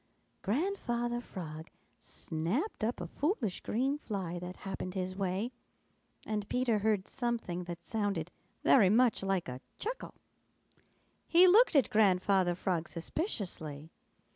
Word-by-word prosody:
Grandfather 240 Hz, -, -1 dB
Frog 160 Hz, -7 st, -7 dB, 0.3 s
snapped 180 Hz, -, -3 dB
up 230 Hz, +3 st, 0 dB
a 175 Hz, -, -4 dB
foolish 255 Hz, -, -1 dB
green 270 Hz, +6 st, 0 dB
fly 185 Hz, -, -4 dB
that 180 Hz, +1 st, -6 dB
happened 190 Hz, -1 st, -4 dB
his 185 Hz, 0 st, -2 dB
way, 195 Hz, +4 st, -1 dB, 0.7 s
and 210 Hz, -2 st, -3 dB
Peter 250 Hz, -4 st, +2 dB
heard 205 Hz, -2 st, +1 dB
something 235 Hz, -9 st, -2 dB
that 170 Hz, -1 st, -7 dB
sounded 200 Hz, -6 st, -1 dB, 0.3 s
very 210 Hz, -8 st, +6 dB
much 235 Hz, +2 st, +4 dB
like 195 Hz, -2 st, 0 dB
a 125 Hz, +1 st, -6 dB, 0.2 s
chuckle. -, -, -4 dB, 1.1 s
He 350 Hz, +2 st, +7 dB
looked 425 Hz, +1 st, +6 dB
at 275 Hz, -, +4 dB
Grandfather 190 Hz, -3 st, +4 dB
Frog 175 Hz, -2 st, -1 dB
suspiciously. 165 Hz, -, -4 dB
200 Hz, 120 wpm, -32 LUFS, 180-240 Hz, 1.1 s, He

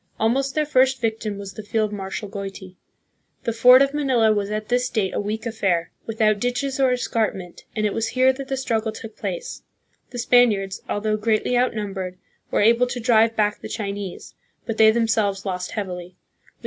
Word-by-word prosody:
Almost 265 Hz, +5 st, +1 dB
their 305 Hz, -1 st, +2 dB
first 265 Hz, -2 st, +3 dB
victim 220 Hz, -3 st, -2 dB
was 200 Hz, -1 st, -8 dB
the 215 Hz, -, -7 dB
field 215 Hz, 0 st, -1 dB
marshal 195 Hz, +1 st, -5 dB
Goiti. 195 Hz, -2 st, -7 dB, 0.7 s
The 230 Hz, -, -1 dB
fort 250 Hz, +4 st, +7 dB
of 275 Hz, 0 st, -1 dB
Manila 255 Hz, -7 st, +3 dB
was 205 Hz, -1 st, -1 dB
at 215 Hz, 0 st, -3 dB
this 250 Hz, +1 st, +1 dB
date 205 Hz, -6 st, -1 dB
a -, -, -1 dB
weak 215 Hz, +3 st, -3 dB
affair, 190 Hz, -7 st, -1 dB, 0.2 s
without 215 Hz, -2 st, +1 dB
ditches 245 Hz, +4 st, -2 dB
or 265 Hz, -1 st, +4 dB
escarpment, 215 Hz, -7 st, -2 dB
and 215 Hz, -, 0 dB
it 210 Hz, -, 0 dB
was 225 Hz, 0 st, -1 dB
here 255 Hz, +3 st, +3 dB
that 270 Hz, 0 st, -7 dB
the 270 Hz, -1 st, -2 dB
struggle 225 Hz, -4 st, -1 dB
took 220 Hz, 0 st, -10 dB
place. -, -, -5 dB, 0.5 s
The 245 Hz, -, -8 dB
Spaniards, 220 Hz, -6 st, +3 dB
although 215 Hz, +1 st, 0 dB
greatly 220 Hz, +3 st, 0 dB
outnum 220 Hz, -5 st, 0 dB
bered, 185 Hz, -2 st, -5 dB, 0.3 s
were -, -, +1 dB
able 235 Hz, +3 st, +4 dB
to 245 Hz, 0 st, -4 dB
drive 225 Hz, -1 st, +3 dB
back 210 Hz, -1 st, +1 dB
the -, -, -7 dB
Chinese; 200 Hz, -3 st, -5 dB, 0.3 s
but 225 Hz, -2 st, -4 dB
they 220 Hz, 0 st, +7 dB
themselves 220 Hz, -3 st, +1 dB
lost 180 Hz, -2 st, -3 dB
heavily. 180 Hz, -3 st, -5 dB
220 Hz, 185 wpm, -23 LUFS, 205-245 Hz, 0.7 s, fort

